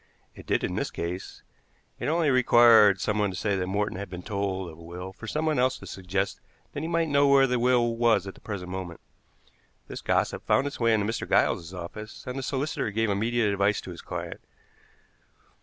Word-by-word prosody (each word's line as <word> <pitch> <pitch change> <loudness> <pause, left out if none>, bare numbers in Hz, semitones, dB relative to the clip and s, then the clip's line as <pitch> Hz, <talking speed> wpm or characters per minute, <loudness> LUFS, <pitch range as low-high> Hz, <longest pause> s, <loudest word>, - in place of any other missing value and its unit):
It - - -13
did - - +1
in - - -1
this - - -2
case. 90 +2 -6 0.6
It - - -3
only 160 -1 +2
required 115 -5 +6
someone 105 0 0
to 95 - -6
say 100 +1 0
that 90 -1 -2
Morton 100 0 -1
had 100 - -6
been 90 -1 -7
told 95 -4 -3
of 80 - -15
a - - -13
will 90 +3 -8
for 115 - -10
someone 155 +2 0
else 130 +1 +2
to - - -12
suggest 95 +1 -3 0.3
that 145 - -4
he 160 - -3
might 165 -1 +1
know 140 -1 +3
where 140 -1 +6
the 125 -2 0
will 120 -1 +2
was 115 -4 +3
at 95 - -7
the - - -19
present 95 -4 -6
moment. 90 -3 -6 0.9
This - - -7
gossip - - 0
found 135 - +2
its 145 - -5
way 115 -1 +3
into 105 -2 0
Mr. 115 +2 -3
Giles's 85 0 +2
office, 95 +4 -8
and 125 - -5
the 135 - -3
solicitor 135 -2 -2
gave 110 +1 0
immediate 110 +1 +1
advice 100 +1 +1
to 95 - -9
his 85 - -9
client. - - -6
105 Hz, 205 wpm, -27 LUFS, 95-125 Hz, 0.9 s, required